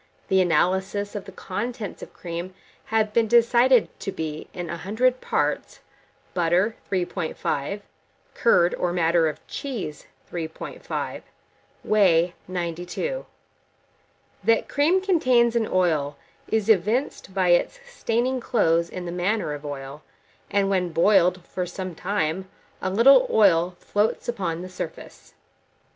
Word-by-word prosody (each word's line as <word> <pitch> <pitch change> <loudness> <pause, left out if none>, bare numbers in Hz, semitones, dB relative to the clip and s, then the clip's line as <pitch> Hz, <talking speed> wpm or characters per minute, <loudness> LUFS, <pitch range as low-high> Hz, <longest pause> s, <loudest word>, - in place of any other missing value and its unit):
The 190 0 +4
analyses 190 +4 +1
of 205 - -5
the 195 - -10
contents 210 +4 -5
of - - -9
cream 175 +2 -6 0.3
have 220 -1 0
been 230 0 +3
decided 235 +1 +5
to 195 - -4
be, 155 -3 -5
in 175 -1 -5
100 220 +10 0
parts - - -1 0.5
butter, 180 +5 +2 0.2
3.5; 180 -1 -2 0.5
curd, 175 -7 +3
or 175 - -1
matter 165 -1 +3
of 155 +1 -9
cheese, 220 - -6 0.2
3.5; 160 -2 -5 0.6
whey, 180 -5 +3 0.2
92.0. 180 - -3 1.2
That 225 +3 +3
cream 320 +6 +2
contains 255 -11 +3
an 225 -2 +1
oil, 155 -6 +1 0.3
is 220 -2 0
evinced 215 0 +1
by 185 -2 +2
its 175 - +3
staining 255 - -1
clothes 170 -8 +2
in 180 -1 -6
the 170 - -4
manner 180 -1 -1
of 145 0 -7
oil; 140 0 -7 0.5
and 200 -1 +2
when 185 -2 +1
boiled 180 +1 +3
for 180 -1 -4
some 185 +1 -6
time, 185 0 -2 0.3
a 185 - -1
little 270 - +6
oil 180 - +4
floats 210 +2 -1
upon 180 -8 -2
the - - -6
surface. 185 - -8
185 Hz, 125 wpm, -24 LUFS, 170-225 Hz, 1.2 s, little